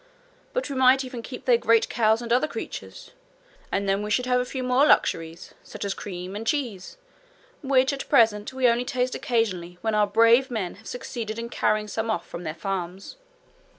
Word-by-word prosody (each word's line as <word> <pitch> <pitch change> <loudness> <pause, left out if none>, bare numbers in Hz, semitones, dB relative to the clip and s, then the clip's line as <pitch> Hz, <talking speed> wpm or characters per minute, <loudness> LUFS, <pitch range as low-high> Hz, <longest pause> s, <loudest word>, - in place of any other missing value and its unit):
But - - -1
we 280 - -5
might 260 +1 +4
even 250 -2 -7
keep 250 +2 -9
their 240 -2 +4
great 230 -1 +3
cows 220 +1 +2
and 235 0 -1
other 260 +5 +3
creatures, - - -8 0.6
and 200 0 -1
then 195 +1 +1
we 210 - -4
should 250 +4 +1
have 250 0 +2
a - - -3
few 255 0 -5
more 250 +2 +3
luxuries, 165 - +1
such - - -8
as 200 - -1
cream 185 -1 -7
and 225 +2 -6
cheese, 245 - -2 0.6
which 265 -1 +2
at 275 - -6
present 220 -6 +3
we 260 -1 +2
only 235 +1 +2
taste 250 0 -1
occasionally, 185 -7 -1
when 220 -1 -1
our 210 -1 +3
brave 230 +5 +4
men 210 -8 -3
have 220 - -16
succeeded 230 -3 -5
in 235 0 -5
carrying 215 -2 0
some 225 +2 -3
off 175 -6 -2
from 170 - -7
their 155 0 -4
farms.' 190 - -5
230 Hz, 195 wpm, -25 LUFS, 205-255 Hz, 0.6 s, might